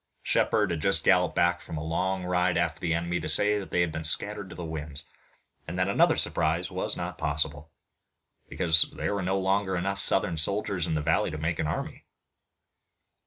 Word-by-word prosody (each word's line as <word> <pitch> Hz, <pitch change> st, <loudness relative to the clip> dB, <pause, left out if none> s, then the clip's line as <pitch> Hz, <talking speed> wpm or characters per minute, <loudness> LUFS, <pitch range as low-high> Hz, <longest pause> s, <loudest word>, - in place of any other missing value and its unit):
Shepard -, -, +1 dB
had 80 Hz, -3 st, -3 dB
just 100 Hz, +4 st, +2 dB
galloped 90 Hz, -2 st, +3 dB
back 85 Hz, 0 st, +2 dB
from 80 Hz, -, -7 dB
a 75 Hz, -, -4 dB
long 90 Hz, +4 st, -2 dB
ride 90 Hz, 0 st, +1 dB
after 85 Hz, -1 st, -1 dB
the 85 Hz, -2 st, -1 dB
enemy 85 Hz, +1 st, -2 dB
to -, -, -3 dB
say 105 Hz, +7 st, +4 dB
that 95 Hz, -, -8 dB
they 90 Hz, -, +1 dB
had 85 Hz, -2 st, 0 dB
been 80 Hz, +1 st, -5 dB
scattered 100 Hz, +5 st, 0 dB
to -, -, -10 dB
the 90 Hz, -, -6 dB
winds, 75 Hz, -3 st, -6 dB, 0.6 s
and 85 Hz, +3 st, -5 dB
that 90 Hz, +1 st, +1 dB
another 100 Hz, -, +3 dB
surprise 80 Hz, +2 st, +1 dB
was -, -, -3 dB
not -, -, -5 dB
possible, 75 Hz, 0 st, -2 dB, 0.8 s
because 80 Hz, -3 st, +5 dB
there -, -, -2 dB
were 100 Hz, -, -2 dB
no 95 Hz, +1 st, -1 dB
longer 95 Hz, 0 st, 0 dB
enough 100 Hz, +2 st, -2 dB
Southern 80 Hz, -, +1 dB
soldiers 100 Hz, +1 st, -1 dB
in 80 Hz, -, -1 dB
the 75 Hz, -, -1 dB
valley 80 Hz, +2 st, +1 dB
to 75 Hz, -, -6 dB
make 80 Hz, +1 st, -2 dB
an -, -, -1 dB
army. -, -, -5 dB
85 Hz, 200 wpm, -27 LUFS, 80-95 Hz, 0.8 s, because